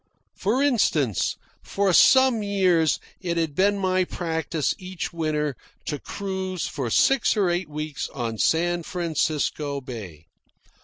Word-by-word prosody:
For 240 +8 +1
instance, 155 - +1 0.3
for 195 -2 0
some 260 +2 +6
years 185 -6 +2 0.2
it 170 -2 -2
had 165 -3 0
been 200 +6 +2
my 185 -1 +1
practice 160 -4 -2
each 185 -1 -5
winter 150 -4 -1 0.3
to 150 - -3
cruise 190 -2 -4
for 130 -5 -3
six 265 - +3
or 190 -4 +2
eight 175 -2 -2
weeks 150 -1 -4
on 115 -4 -4
San 175 +1 +2
Francisco 155 -4 -1
Bay. 105 - -9
170 Hz, 125 wpm, -24 LUFS, 150-190 Hz, 0.3 s, some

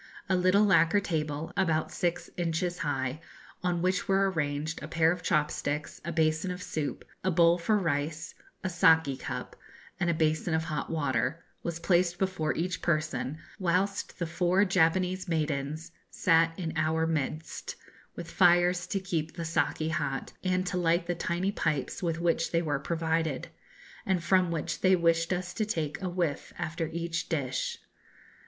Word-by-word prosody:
A 190 - +2
little 185 +3 +4
lacquer 195 -1 +5
table, 155 -4 -3
about 165 -5 +1
six 175 -1 -1
inches 175 +1 -1
high, 135 -1 -2 0.4
on 175 -1 0
which 185 +1 +1
were 195 0 +3
arranged 150 -1 -2
a 150 - -6
pair 160 0 +3
of 180 -1 -3
chop 150 -2 +2
sticks, 150 +1 -3
a 170 - -3
basin 160 +2 +1
of 180 0 -5
soup, 150 -2 -3 0.2
a 190 - +2
bowl 170 0 +4
for 210 +5 +2
rice, 160 -2 -2 0.3
a - - 0
saki 160 -4 +4
cup, - - -6 0.4
and 175 - +1
a 170 - +2
basin 160 +1 +1
of 160 - 0
hot 155 -2 -3
water, 145 -1 -1 0.2
was 170 -1 -4
placed 175 0 +2
before 180 -5 -1
each 180 +2 -2
person, 155 -4 -1 0.2
whilst 190 +2 0
the 170 - -1
four 180 +4 +2
Japanese 185 +1 +2
maidens 155 -1 -2 0.2
sat 165 -1 +3
in 165 -3 -3
our 160 +1 +1
midst, 160 0 -3 0.4
with 170 -1 -7
fires 175 0 +4
to 195 - -1
keep 165 -4 -3
the 170 - -4
saki 160 -1 0
hot, 150 -4 -2
and 185 0 +1
to 180 0 -2
light 170 0 +2
the 175 - -1
tiny 175 +3 -1
pipes 155 -7 -1
with 165 -2 -1
which 165 -1 +1
they 170 0 +2
were 145 -3 0
provided, 160 -2 -1 0.5
and 185 -3 0
from 185 -1 +3
which 165 -2 -3
they 185 0 +5
wished 165 -1 +2
us 180 0 -2
to 220 - -1
take 160 -8 -2
a 185 - -2
whiff 175 -5 -2
after 165 +1 -2
each 170 0 -3
dish. 135 -5 -1
165 Hz, 165 wpm, -29 LUFS, 155-180 Hz, 0.5 s, lacquer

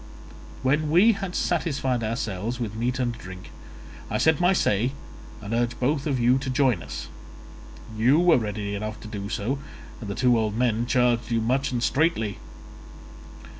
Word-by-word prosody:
When 150 +4 +2
we 185 +9 +6
had 195 -4 -4
satisfied 135 -8 0
ourselves 115 0 -3
with 110 -4 -3
meat 120 +3 -1
and 125 -2 0
drink, 95 -4 -10 0.6
I - - 0
said 160 0 +3
my 175 +1 +5
say 120 - +1 0.5
and 105 +2 -4
urged 120 0 0
both 140 +3 0
of 135 -4 0
you 125 +2 +4
to 135 0 -4
join 130 -8 +2
us. - - -7 0.9
You 120 +7 +4
were 175 -5 +5
ready 105 -2 -3
enough 110 +1 -4
to - - -9
do 100 -1 -6
so, 125 +8 -2 0.4
and 105 - -7
the 100 - -3
two 125 -2 +3
old 110 -1 -1
men 120 -1 +1
charged 125 -2 +2
you 115 -1 +1
much 130 +5 0
and 120 -1 -1
straitly. 135 -10 +1
120 Hz, 170 wpm, -25 LUFS, 110-135 Hz, 0.9 s, we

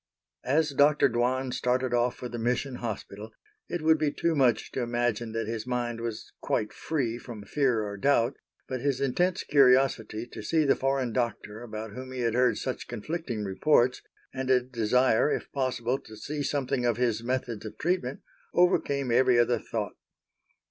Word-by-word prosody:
As 150 +3 +2
Dr. 145 +1 +4
Dwan 125 +2 0
started 125 0 0
off 120 0 +2
for 125 - -6
the 120 0 -6
Mission 125 +3 -1
Hospital, 110 -2 -6 0.4
it 175 -3 -3
would 160 0 +4
be 150 -2 +1
too 170 +2 0
much 125 -7 +2
to 130 - -2
imagine 120 -1 -1
that 115 0 -1
his 110 +1 -4
mind 120 -2 -2
was 115 -2 -5
quite 105 - -1
free 125 -7 -2
from 115 -5 -9
fear 125 -3 +1
or 100 -1 -5
doubt, 125 +1 +2 0.3
but 130 -2 -4
his 140 -2 0
intense 175 +7 +1
curiosity 125 -5 +3
to 120 - -9
see 155 +8 +1
the 140 - +4
foreign 135 -3 0
Doctor 115 -3 -2
about 110 -2 -6
whom 130 +3 -8
he 130 -1 -4
had 115 -2 +1
heard 125 0 +3
such 130 - -4
conflicting 120 -1 -4
reports, 120 +5 +2 0.3
and 130 0 -3
a 130 -1 +6
desire, 125 +1 +2
if - - -3
possible, 130 -1 -1
to 110 0 -13
see 145 +6 -4
something 135 -2 -1
of 120 -2 +1
his 120 -3 +1
methods 120 -3 -2
of 110 - -8
treatment, 180 +3 -1 0.3
overcame 140 -7 +2
every 125 +1 +4
other 120 0 +3
thought. 105 -2 -4
125 Hz, 175 wpm, -28 LUFS, 115-135 Hz, 0.4 s, a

